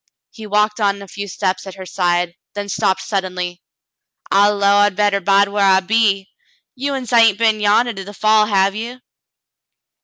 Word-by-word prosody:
He 220 -2 -11
walked 210 +1 0
on 200 -1 0
a - - -12
few 200 +2 -7
steps 185 0 -3
at 190 - -9
her 190 -1 -9
side, 175 -1 -1 0.2
then 205 0 -5
stopped 190 0 -1
suddenly. 180 -3 -4 0.7
"I 200 +1 +4
'low 200 -1 +2
I 205 0 +4
better 205 0 0
bide 200 +1 +3
whar 205 0 -2
I 190 -1 +5
be. 195 -1 +1 0.5
You 275 +2 -3
uns 255 -4 -6
hain't 225 -4 +5
been 220 -1 +1
yandah 215 +3 +2
to 195 - -5
the 200 - -10
fall, 215 +1 +2
have 195 -1 +2
ye 235 +4 -7
200 Hz, 180 wpm, -18 LUFS, 195-215 Hz, 0.7 s, I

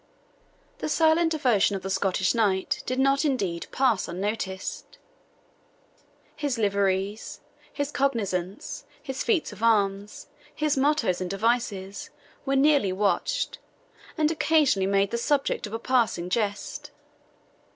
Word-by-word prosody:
The - - -3
silent 325 +1 +3
devotion 245 -10 +2
of 190 - -5
the 190 - -4
Scottish 190 -1 +1
knight 200 -5 +1
did 255 - -1
not, 275 +1 +3
indeed, 195 - -1
pass 255 -7 +1
unnoticed; 190 +1 -4 1.4
his 285 -5 -2
liveries, 200 0 -1 0.3
his 285 0 -3
cognizances, 200 -10 -2 0.2
his 265 -3 -4
feats 360 - 0
of 205 - -13
arms, 205 -3 +1 0.3
his 305 -1 +1
mottoes 265 -10 +1
and 180 - -3
devices, 200 -2 -1 0.4
were 275 - +2
nearly 275 -7 +4
watched, 205 - 0 0.6
and 310 0 +2
occasionally 305 -11 +2
made 195 0 +2
the 235 - -1
subject 275 -3 0
of 210 - -10
a - - -1
passing 230 -8 0
jest. 205 -1 -2
225 Hz, 120 wpm, -26 LUFS, 195-275 Hz, 1.4 s, nearly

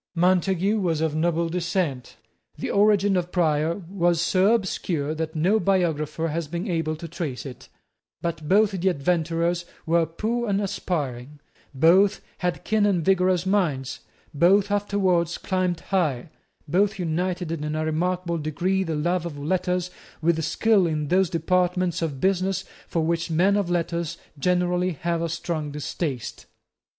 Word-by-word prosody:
Montague 185 +4 +2
was 170 -5 0
of 160 -1 0
noble 165 +1 +1
descent: 170 -6 -2 0.4
the - - -3
origin 205 -1 +4
of 180 -1 -1
Prior 165 +1 +1
was 175 -3 +1
so 190 +5 +3
obscure 170 -7 -2
that 160 0 -4
no 185 +8 +3
biographer 165 -4 0
has 160 0 -3
been 170 +6 -4
able 165 -3 -1
to 165 +2 -8
trace 155 -7 -5
it: 130 -3 -10 0.5
but 160 -3 -4
both 210 +2 +4
the 190 0 +1
adventurers 170 +2 0 0.2
were 165 0 +2
poor 225 +8 -2
and 200 0 +1
aspiring; 150 -9 -3 0.4
both 185 +8 +5 0.2
had 180 -1 -2
keen 215 -1 +2
and 180 -6 +1
vigorous 185 -1 +3
minds; 165 -10 0 0.3
both 190 +7 +4
afterwards 190 -4 +1
climbed 185 -3 -1
high; 160 -7 -1 0.4
both 195 +6 +2
united 180 0 -2
in 150 -1 -3
a 155 0 -1
remarkable 170 +2 -1
degree 175 +6 0
the 165 -3 -3
love 175 +3 0
of 150 -4 -8
letters 180 +4 -1 0.3
with 160 0 +1
skill 200 +3 +3
in 150 -3 -2
those 185 0 +3
departments 180 0 0
of 150 -5 -2
business 190 +1 0 0.2
for 165 - -1
which 165 +1 -1
men 180 +5 +3
of 200 -4 0
letters 170 -1 -1 0.2
generally 180 +2 +1
have 170 +2 -2
a 170 - -1
strong 160 -2 -3
distaste. 145 -2 -4
175 Hz, 145 wpm, -24 LUFS, 160-185 Hz, 0.5 s, both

